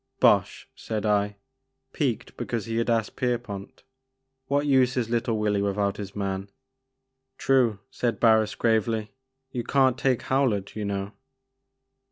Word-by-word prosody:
" -, -, -49 dB
Bosh," -, -, 0 dB
said 110 Hz, -1 st, -4 dB
I, 105 Hz, -1 st, +1 dB, 0.6 s
piqued 130 Hz, -7 st, -2 dB
because 115 Hz, -4 st, -3 dB
he 115 Hz, 0 st, -3 dB
had 115 Hz, +1 st, 0 dB
asked 115 Hz, -2 st, 0 dB
Pierpont, 120 Hz, -6 st, -3 dB, 0.6 s
"what 145 Hz, +1 st, +1 dB
use 130 Hz, -3 st, +3 dB
is 115 Hz, -2 st, -1 dB
little 115 Hz, -1 st, 0 dB
Willy 105 Hz, -1 st, +1 dB
without 100 Hz, 0 st, 0 dB
his 100 Hz, -1 st, -7 dB
man?" 100 Hz, -1 st, -3 dB, 0.9 s
"True," 125 Hz, -6 st, +3 dB
said 120 Hz, -2 st, -1 dB
Barris 110 Hz, -2 st, +4 dB
gravely, 110 Hz, -1 st, +1 dB, 0.4 s
"you 120 Hz, -2 st, -3 dB
can't 130 Hz, -1 st, +2 dB
take 130 Hz, -3 st, +1 dB
Howlett 125 Hz, -8 st, 0 dB
you 105 Hz, -1 st, -3 dB
know." 100 Hz, 0 st, -3 dB
110 Hz, 140 wpm, -26 LUFS, 100-125 Hz, 0.9 s, Barris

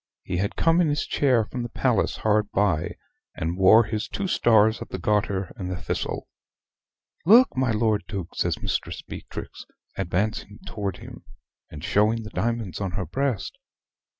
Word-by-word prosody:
He -, -, -3 dB
had 100 Hz, +3 st, -1 dB
come 165 Hz, +1 st, +3 dB
in 170 Hz, -, +3 dB
his 145 Hz, 0 st, 0 dB
chair 125 Hz, -6 st, +2 dB
from 125 Hz, +3 st, -5 dB
the 120 Hz, -, -4 dB
palace 115 Hz, -3 st, +1 dB
hard 105 Hz, -1 st, +1 dB
by, 100 Hz, -7 st, +1 dB, 0.4 s
and 80 Hz, +2 st, -2 dB
wore 95 Hz, +5 st, +7 dB
his 110 Hz, 0 st, -3 dB
two 200 Hz, -, -4 dB
stars 110 Hz, -, +4 dB
of -, -, -7 dB
the -, -, -4 dB
Garter 100 Hz, 0 st, 0 dB
and 90 Hz, -2 st, -5 dB
the 90 Hz, -1 st, -4 dB
Thistle. -, -, -3 dB, 1.0 s
"Look, 235 Hz, +8 st, +6 dB
my 130 Hz, -1 st, +1 dB
Lord 110 Hz, -1 st, +1 dB
Duke," 95 Hz, -5 st, -5 dB
says -, -, -1 dB
Mistress -, -, -3 dB
Beatrix, -, -, -8 dB, 0.3 s
advancing 100 Hz, +3 st, -2 dB
to 100 Hz, -2 st, -3 dB
him, -, -, -11 dB, 0.5 s
and 75 Hz, 0 st, -9 dB
showing 105 Hz, +3 st, +2 dB
the 105 Hz, -, -9 dB
diamonds 115 Hz, -6 st, -2 dB
on 95 Hz, -3 st, -2 dB
her 90 Hz, 0 st, -2 dB
breast. 130 Hz, -, -2 dB
105 Hz, 165 wpm, -25 LUFS, 95-120 Hz, 1.0 s, wore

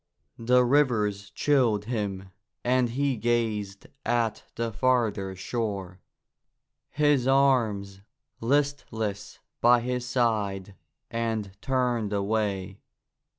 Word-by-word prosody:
The 125 Hz, +2 st, +4 dB
rivers 110 Hz, -7 st, +1 dB
chilled 120 Hz, -8 st, +2 dB
him 100 Hz, -5 st, -3 dB, 0.3 s
and 125 Hz, 0 st, +2 dB
he 135 Hz, +2 st, 0 dB
gazed 110 Hz, -4 st, -1 dB, 0.2 s
at 115 Hz, -3 st, 0 dB
the 115 Hz, -1 st, -2 dB
farther 110 Hz, -6 st, +1 dB
shore, 100 Hz, -3 st, -4 dB, 0.9 s
his 145 Hz, -4 st, +2 dB
arms 115 Hz, -8 st, +2 dB, 0.4 s
listless 115 Hz, -6 st, -1 dB, 0.2 s
by 120 Hz, 0 st, +6 dB
his 125 Hz, 0 st, -2 dB
side, 105 Hz, -6 st, -1 dB, 0.4 s
and 110 Hz, -4 st, -2 dB
turned 125 Hz, -5 st, 0 dB
away. 100 Hz, -2 st, -1 dB
115 Hz, 90 wpm, -27 LUFS, 100-125 Hz, 0.9 s, by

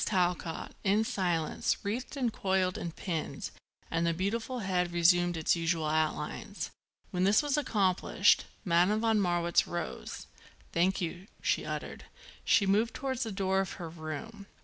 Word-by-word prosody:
Talcott, 180 Hz, -3 st, 0 dB
in 205 Hz, +2 st, +3 dB
silence, 175 Hz, -7 st, 0 dB
wreathed 240 Hz, +8 st, -3 dB
and 245 Hz, -4 st, 0 dB
coiled 190 Hz, -2 st, +1 dB
and 170 Hz, -1 st, -5 dB
pinned 165 Hz, -5 st, -4 dB, 0.4 s
and 165 Hz, +1 st, +1 dB
the 165 Hz, -, +1 dB
beautiful 225 Hz, +7 st, -2 dB
head 180 Hz, -3 st, 0 dB
resumed 175 Hz, 0 st, +4 dB
its 160 Hz, -, +2 dB
usual 165 Hz, -1 st, 0 dB
outlines. 155 Hz, 0 st, -1 dB, 0.4 s
When 180 Hz, -2 st, 0 dB
this 200 Hz, +8 st, +5 dB
was 290 Hz, -1 st, +1 dB
accomplished 200 Hz, -7 st, +3 dB, 0.2 s
Madame 180 Hz, +5 st, +3 dB
von 225 Hz, -2 st, +3 dB
Marwitz 175 Hz, -2 st, +2 dB
rose. 175 Hz, 0 st, -5 dB, 0.5 s
"Thank 185 Hz, +3 st, +2 dB
you," 175 Hz, +2 st, -4 dB, 0.2 s
she -, -, +1 dB
uttered. -, -, -5 dB, 0.4 s
She 200 Hz, -, +4 dB
moved 215 Hz, +4 st, +2 dB
towards 260 Hz, -2 st, -2 dB
the 225 Hz, -3 st, -1 dB
door 190 Hz, -1 st, +1 dB
of 195 Hz, -2 st, -1 dB
her 170 Hz, -2 st, -6 dB
room. 170 Hz, +7 st, -7 dB
185 Hz, 150 wpm, -31 LUFS, 170-210 Hz, 0.5 s, this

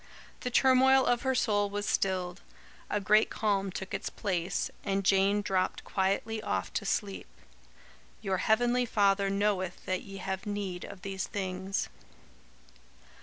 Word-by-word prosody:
The 250 Hz, -, -3 dB
turmoil 265 Hz, +1 st, +5 dB
of 245 Hz, -1 st, +2 dB
her 265 Hz, -1 st, 0 dB
soul 205 Hz, -4 st, +2 dB
was 205 Hz, +1 st, -3 dB
stilled; 185 Hz, -2 st, -1 dB, 0.5 s
a 205 Hz, -, 0 dB
great 210 Hz, +2 st, +4 dB
calm 200 Hz, -3 st, 0 dB
took 190 Hz, +1 st, -6 dB
its 195 Hz, -, -2 dB
place, 180 Hz, -3 st, -2 dB
and 195 Hz, -1 st, -1 dB
Jane 195 Hz, +2 st, +3 dB
dropped 185 Hz, -1 st, 0 dB
quietly 200 Hz, +3 st, -1 dB
off -, -, -2 dB
to -, -, -2 dB
sleep. 200 Hz, -3 st, -2 dB, 0.9 s
"Your 195 Hz, -3 st, -1 dB
heavenly 240 Hz, +5 st, +2 dB
Father 200 Hz, -2 st, +3 dB
knoweth 195 Hz, -2 st, -1 dB
that 185 Hz, 0 st, -1 dB
ye 195 Hz, -1 st, -9 dB
have 190 Hz, +1 st, -4 dB
need 200 Hz, -3 st, -3 dB
of 195 Hz, -, -11 dB
these 195 Hz, -1 st, -3 dB
things." 190 Hz, -1 st, -3 dB
195 Hz, 140 wpm, -30 LUFS, 190-215 Hz, 0.9 s, turmoil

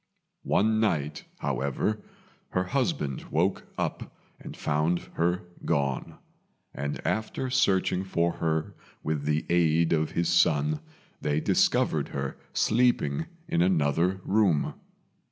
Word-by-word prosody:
One 110 Hz, +1 st, +3 dB
night, 75 Hz, -9 st, 0 dB, 0.2 s
however, 70 Hz, +10 st, -1 dB, 0.5 s
her 90 Hz, -, +2 dB
husband 125 Hz, -, -1 dB
woke 90 Hz, +5 st, 0 dB
up -, -, -4 dB, 0.2 s
and -, -, -9 dB
found 75 Hz, +4 st, +1 dB, 0.2 s
her 90 Hz, +2 st, +1 dB, 0.2 s
gone; 70 Hz, -2 st, -1 dB, 0.6 s
and 70 Hz, +1 st, -3 dB
after 110 Hz, +4 st, -1 dB
searching 95 Hz, -5 st, +2 dB
for 85 Hz, -3 st, +1 dB
her 80 Hz, -1 st, -1 dB, 0.3 s
with 75 Hz, -2 st, -2 dB
the 75 Hz, +1 st, +1 dB
aid 85 Hz, -1 st, +3 dB
of 80 Hz, -1 st, +1 dB
his 85 Hz, -1 st, +1 dB
son, 75 Hz, -3 st, +3 dB, 0.4 s
they 75 Hz, 0 st, +1 dB
discovered -, -, +2 dB
her 70 Hz, -1 st, -4 dB, 0.2 s
sleeping 110 Hz, -, +2 dB, 0.2 s
in 85 Hz, -, +1 dB
another 90 Hz, +1 st, +2 dB
room. 95 Hz, -8 st, +2 dB
85 Hz, 115 wpm, -28 LUFS, 75-95 Hz, 0.6 s, One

